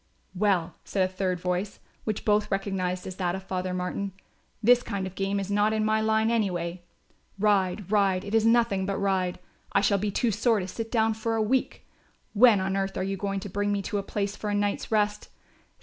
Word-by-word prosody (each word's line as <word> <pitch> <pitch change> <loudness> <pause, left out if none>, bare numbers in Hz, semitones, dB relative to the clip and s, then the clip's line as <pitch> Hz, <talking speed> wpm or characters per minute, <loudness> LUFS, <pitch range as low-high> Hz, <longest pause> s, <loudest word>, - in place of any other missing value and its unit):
"Well," 185 -3 +1
said 190 -2 0
a 185 - -15
third 185 -1 -1
voice, 180 +3 -2 0.3
which 215 -2 -3
both 210 0 +2
recognised 190 -2 -2
as 185 - -7
that 180 -1 0
of 190 - -6
Father 185 -1 -3
Martin, 180 +2 -3 0.5
"This 245 +2 +6
kind 200 -5 -3
of 185 - -6
game 195 +1 -1
is 195 0 -4
not 205 +1 +2
in 215 0 +1
my 220 0 +2
line 220 +1 +2
anyway. 180 -6 -1 0.6
Ride, 195 -1 +1
ride, 195 -3 +2
it 200 - -6
is 225 -1 +4
nothing 225 -4 +3
but 195 - -1
ride. 190 -2 0 0.4
I - - +4
shall 200 -1 +2
be 210 +2 -1
too 225 +3 +1
sore 220 +2 +2
to 185 - -4
sit 225 +4 -5
down 225 -2 +2
for 225 +1 -2
a 225 - +1
week; 255 +4 -1 0.5
when 225 -1 +6
on 190 0 -1
earth 195 0 -2
are - - -1
you 195 +1 -2
going 195 0 -3
to 205 - -6
bring 205 +2 -1
me 200 -1 -1
to 205 0 -2
a - - -1
place 200 0 -3
for 210 - -4
a 205 - 0
night's 205 +1 -1
rest? 210 -1 0
200 Hz, 215 wpm, -27 LUFS, 190-215 Hz, 0.6 s, This